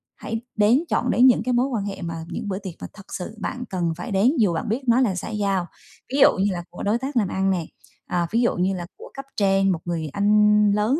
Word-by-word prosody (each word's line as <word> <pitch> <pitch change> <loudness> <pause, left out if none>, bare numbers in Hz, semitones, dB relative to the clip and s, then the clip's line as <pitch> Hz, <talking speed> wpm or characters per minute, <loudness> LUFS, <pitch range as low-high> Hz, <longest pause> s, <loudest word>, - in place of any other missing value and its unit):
hãy 225 0 -5
đến 220 +8 +4
chọn - - +1
đến 250 +2 +6
những 245 -4 +4
cái 250 +1 0
mối 245 +2 +2
quan 230 -7 -2
hệ 200 -1 -5
mà 170 -1 -4
những 175 +4 -5
bữa 190 -2 -2
tiệc 190 -4 -7
mà - - -5
thật 195 -2 -13
sự 195 +4 -5
bạn 250 - -4
cần 175 -3 -1
phải 175 - -6
đến 200 +6 +4
dù 200 -6 +3
bạn 185 +7 -3
biết 230 +6 -1
nó 235 +1 +4
là 210 -8 +1
xã 180 - -5
giao. 200 -4 0 0.5
Ví - - +1
dụ - - +6
như 195 +2 +1
là 175 -1 -4
của 175 - -8
đối 210 +3 +2
tác 265 +2 -4
làm 210 -5 +2
ăn 190 +1 0
nè, 175 -4 -1 0.4
ờ, 175 -1 0
ví 230 +2 +2
dụ 240 - +2
như 185 +2 +1
là 175 -1 -5
của 465 +4 -12
cấp 275 0 -8
trên, 195 -1 +3
một 175 - -1
người 165 -3 -3
anh 210 0 +4
lớn 210 +8 +1
205 Hz, 270 wpm, -23 LUFS, 185-230 Hz, 0.5 s, đến